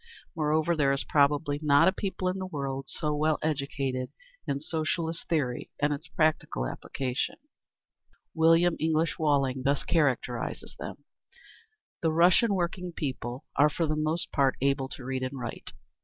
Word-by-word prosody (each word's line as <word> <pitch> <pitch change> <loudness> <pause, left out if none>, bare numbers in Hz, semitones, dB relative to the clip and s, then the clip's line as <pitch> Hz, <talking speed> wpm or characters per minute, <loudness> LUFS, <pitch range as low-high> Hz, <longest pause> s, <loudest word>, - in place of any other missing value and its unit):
Moreover, 155 +2 +1
there 140 -3 +3
is 140 - -2
probably 145 0 +2
not 145 -2 +5
a - - +6
people 190 -1 -3
in 185 +1 -1
the 185 - -4
world 135 -4 -4
so 150 -2 -1
well 155 +1 +2
educated 140 -4 -2 0.4
in 140 - -1
Socialist 160 +2 -2
theory 130 -7 -1
and 150 0 +2
its 145 - -6
practical 155 - 0
application. 125 - -3 1.0
William 165 +1 +4
English 160 0 +1
Walling 140 -4 +2
thus 140 +2 +1
characterises 125 -6 -1
them: - - -7 1.0
The 160 - +2
Russian 180 +6 +5
working 180 0 -2
people 130 -3 -4
are 145 +1 +5
for 165 +3 -1
the 155 0 0
most 155 +3 -1
part 135 -2 +2
able 135 0 +1
to 130 - -9
read 130 0 -2
and 130 +1 -4
write. 120 -2 -5
150 Hz, 150 wpm, -28 LUFS, 135-165 Hz, 1.0 s, a